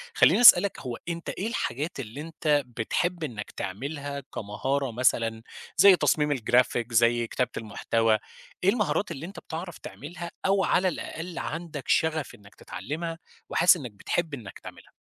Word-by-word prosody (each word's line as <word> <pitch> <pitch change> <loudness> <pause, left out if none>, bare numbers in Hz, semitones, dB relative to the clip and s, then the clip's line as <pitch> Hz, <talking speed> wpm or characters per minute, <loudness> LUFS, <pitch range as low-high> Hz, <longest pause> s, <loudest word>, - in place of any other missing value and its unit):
خلّيني - - +5
اسألك 200 -4 +8
هو 125 -3 -5
أنت 170 0 -4
إيه 205 - -3
الحاجات 145 - -3
اللي 125 +3 -6
أنت 150 -2 0
بتحب 170 +9 -1
إنّك 110 -8 -5
تعملها 140 +8 -5
كمهارة 130 +6 -2
مثلًا، 115 -2 +1 0.4
زي 200 -2 +8
تصميم 150 -4 +2
الGraphic 120 0 +1
زي 120 +1 +3
كتابة 125 +2 -1
المحتوى، 110 0 +1 0.5
إيه 185 - +5
المهارات 210 -3 0
اللي 155 0 -6
أنت 195 +4 -9
بتعرف 170 +1 -7
تعملها 170 +3 -8
أو 195 0 +3
على 185 +1 +2
الأقل 170 0 -5
عندك 160 -4 -5
شَغف 155 -6 +1
إنّك 100 -2 -18
تتعلّمها، 165 - -6 0.3
وحاسس 180 +1 +5
إنّك 125 -8 -7
بتحب 160 - -2
إنك 110 -9 -8
تعملها؟ - - -12
145 Hz, 145 wpm, -27 LUFS, 120-170 Hz, 0.5 s, اسألك